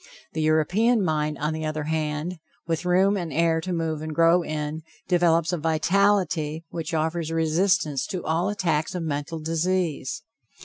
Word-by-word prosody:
The 160 - -2
European 185 +9 +3
mind, 150 -2 0
on 150 +1 -1
the 160 0 -4
other 155 0 -2
hand, 155 +2 -2 0.3
with 165 +1 -2
room 190 +3 +3
and 175 -5 -3
air 165 +2 +2
to 185 - -4
move 165 -3 -2
and 155 -1 -5
grow 170 +1 +5
in, 155 -1 -4 0.3
develops 170 -2 +3
a 175 - -1
vitality 165 -1 +1
which 165 0 -4
offers 160 +1 -1
resistance 165 -2 +1
to 185 - -5
all 165 +5 +1
attacks 175 -5 -1
of 175 - -2
mental 145 +1 -3
disease. 165 -2 -1
165 Hz, 160 wpm, -25 LUFS, 155-180 Hz, 0.3 s, grow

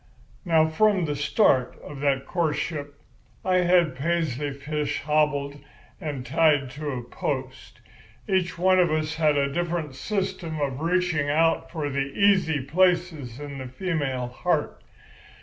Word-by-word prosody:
"Now, 160 -2 +4
from 195 +2 +2
the 145 -1 -2
start 140 - +2
of 145 -1 -9
that 135 -1 +1
courtship 150 -3 -2 0.5
I 185 -1 +3
had 175 -5 +3
Paisley 150 -2 -1
Fish 145 +2 -3
hobbled 145 -1 +1 0.4
and 140 -5 -4
tied 145 -4 +2
to 150 +2 -5
a 125 -3 -4
post. 130 +1 -5 0.5
Each 180 -2 0
one 185 +1 +4
of 175 -1 +4
us 155 0 -1
had 155 -2 +3
a 140 0 0
different 170 -4 -2
system 190 -1 -3
of 140 -1 -2
reaching 170 -4 +1
out 165 +2 +2
for 155 -3 -3
the 140 0 -3
easy 190 -7 +4
places 165 -6 +1
in 145 -2 -7
the 130 - -6
female 135 -3 -2
heart. 125 - -1
155 Hz, 140 wpm, -25 LUFS, 140-175 Hz, 0.5 s, Now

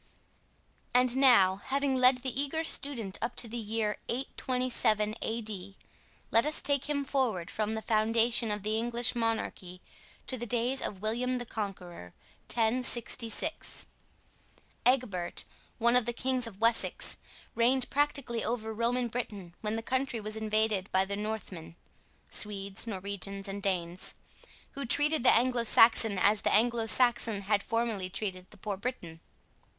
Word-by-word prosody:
And 250 0 +4
now, 240 -9 +5
having 275 +5 -1
led 255 0 +4
the 265 +1 0
eager 315 +3 -2
student 240 -11 -1
up 235 - -3
to 235 - -2
the 225 - -7
year 215 -1 -2
827 250 -4 0
A.D., 210 -4 -5 0.5
let 230 - +4
us 300 +1 -1
take 280 -2 0
him 285 -1 -2
forward 240 -11 -1
from 215 0 -2
the 220 - -5
foundation 225 +1 +2
of 210 -1 -3
the 215 +1 0
English 240 +1 0
monarchy 225 -6 -3 0.5
to 255 - -2
the 240 - -5
days 245 +4 0
of 195 0 -5
William 245 +4 -1
the 245 - -5
Conqueror, 180 - -7 0.4
1066. 235 0 0 1.0
Egbert, 225 -9 0 0.3
one 235 +1 +3
of 250 -2 +3
the 240 - 0
kings 255 0 -1
of 200 -4 -11
Wessex, 230 +1 +2 0.4
reigned 245 +2 +2
practically 280 -5 0
over 220 -1 -3
Roman 240 +2 0
Britain 210 -7 -6
when 215 0 -2
the 225 - -4
country 260 -1 -1
was 215 0 -5
invaded 215 -2 0
by 190 0 +3
the 200 +1 -3
Northmen 205 -6 -6 0.6
(Swedes, 200 0 0
Norwegians, 200 -1 -3
and 200 +1 -5
Danes), 180 -2 -2 0.6
who 280 - -6
treated 295 +4 +4
the - - +6
Anglo 245 0 +2
Saxon 225 -2 +6
as 205 +3 +3
the - - +1
Anglo 230 +1 +2
Saxon 230 -3 +4
had 205 +1 +1
formerly 225 -4 -2
treated 185 -2 -5
the - - -15
poor 200 0 -4
Briton. 185 -8 -6
225 Hz, 145 wpm, -30 LUFS, 200-250 Hz, 1.0 s, the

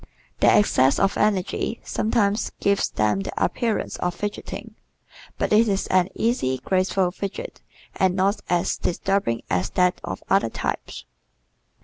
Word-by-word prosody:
Their - - +5
excess 135 -10 +3
of 195 0 +2
energy 210 +2 0
sometimes 215 -1 0
gives 200 0 +1
them 105 -2 +1
the 95 - -4
appearance 230 -4 -2
of 180 -1 -2
"fidgeting," 205 +2 -6 0.6
but - - 0
it 225 +2 +5
is 195 -2 0
an 185 0 +3
easy, 220 - 0
graceful 185 +5 +1
fidget 200 - -6 0.3
and 185 -1 +2
not 195 +2 +1
as 175 +1 +1
disturbing 180 -9 -1
as 90 +3 +1
that 180 -1 +1
of - - -6
other 195 -11 +2
types. - - -4
190 Hz, 135 wpm, -23 LUFS, 175-205 Hz, 0.6 s, Their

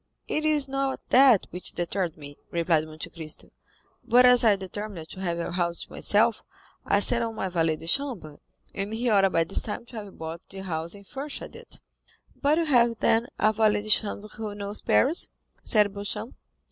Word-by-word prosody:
"It 310 - -1
is 300 -3 +3
not 270 0 -1
that 255 -5 +6
which 180 - -6
deterred 175 -1 -2
me," 145 -1 -10
replied 165 -2 +1
Monte 155 0 -7
Cristo; 160 -3 -6 0.5
"but 250 +1 +5
as 250 -1 +6
I 215 -3 +5
determined 190 -3 -7
to - - -8
have 175 -3 -2
a 170 - -3
house 170 -1 -1
to - - -15
myself, - - +2 0.5
I 200 - +3
sent 235 +3 +3
on 225 -1 -4
my 190 -3 -2
valet 165 -3 +1
de 155 - -11
chambre, 200 - -1 0.3
and 200 +2 -4
he 235 +1 0
ought 195 -2 +4
by 165 - +3
this 165 - -1
time 215 +2 -5
to 240 -1 -10
have 200 - -13
bought 160 +1 -6
the 190 0 -8
house 165 0 -4
and 200 0 -14
furnished 275 +7 -6
it." - - -11 0.5
"But 295 +2 +2
you 335 - +1
have, 240 -5 +3
then, 225 +2 +2
a 215 - +3
valet 210 -1 +2
de 215 - -8
chambre 210 0 +2
who 215 -1 -6
knows 205 0 -5
Paris?" 305 +7 +3 0.3
said 210 -3 +2
Beauchamp. 205 +3 -4
205 Hz, 195 wpm, -26 LUFS, 170-235 Hz, 0.5 s, that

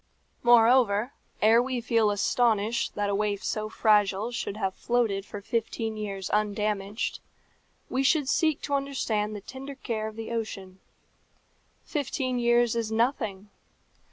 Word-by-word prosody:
Moreover, 240 -1 +4 0.3
ere 225 +2 +6
we 255 0 -2
feel 230 -2 +2
astonished 220 +1 +1
that 205 -1 0
a - - 0
waif 205 0 -1
so 215 0 -2
fragile 210 0 +2
should 210 -4 -4
have 195 -3 -1
floated 220 -5 0
for 205 - -7
fifteen 225 0 -2
years 200 -3 -4
undamaged, 210 0 -1 0.7
we 260 - -1
should 280 +1 +2
seek 315 +1 +1
to 285 - -3
understand 235 -7 -1
the 205 - -6
tender 270 +5 -8
care 220 -5 -3
of 215 - -8
the 225 +1 -6
ocean. 195 -5 -5 1.0
Fifteen 260 -4 -2
years 240 -1 +3
is 230 -2 -2
nothing. 220 -4 -1
220 Hz, 135 wpm, -27 LUFS, 205-245 Hz, 1.0 s, ere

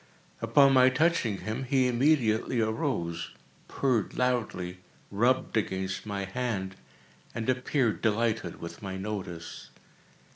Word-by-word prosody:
Upon 140 -1 +5
my 130 0 +7
touching 130 - +1
him, 110 +5 -3
he 130 -1 +2
immediately 125 -2 +2
arose, 110 - -2 0.3
purred 125 -7 0
loudly, 110 -8 -1 0.3
rubbed 120 +6 +1
against 95 -1 -2
my 100 -1 -3
hand, 95 -3 -3 0.6
and 115 -1 -3
appeared 130 -2 +1
delighted 110 -4 0
with 85 +6 -8
my 95 -2 -5
notice. 95 -5 -6
110 Hz, 110 wpm, -28 LUFS, 95-130 Hz, 0.6 s, my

